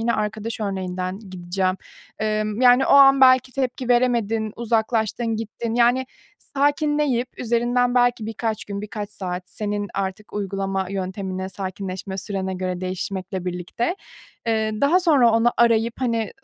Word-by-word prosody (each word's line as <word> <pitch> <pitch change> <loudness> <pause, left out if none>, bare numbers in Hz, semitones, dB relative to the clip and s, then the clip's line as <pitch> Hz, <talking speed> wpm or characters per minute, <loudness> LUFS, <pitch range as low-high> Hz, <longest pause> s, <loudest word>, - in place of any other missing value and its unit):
Yine 235 +1 +1
arkadaş 215 +1 -3
örneğinden 185 -2 -3
gideceğim. 185 +1 -1 0.4
Emm, 215 0 -1
yani, 250 +1 +6
o - - 0
an 275 -1 +7
belki 255 -1 +6
tepki 255 -1 -2
veremedin, 230 -3 +1
uzaklaştın 225 0 0
gittin. 225 +1 -4
Yani, 245 +2 +3 0.3
sakinleyip 285 -3 0
üzerinden 245 +1 +1
belki 245 -3 +2
birkaç 225 0 -3
gün, 200 -1 -5
birkaç 210 0 -6
saat, 180 -3 -5
senin 205 -1 -3
artık 195 +2 -4
uygulama 195 -1 -2
yöntemine, 190 0 -4
sakinleşme 190 0 -5
sürene 190 -1 -3
göre 185 -1 -3
değişmekle 185 0 -4
birlikte, 180 - -2 0.5
eee, 220 -1 +1
daha 320 +6 +4
sonra 290 -9 +5
onu 230 +1 +3
arayıp, 230 0 +3
hani, 230 -4 0
220 Hz, 130 wpm, -22 LUFS, 195-245 Hz, 0.5 s, an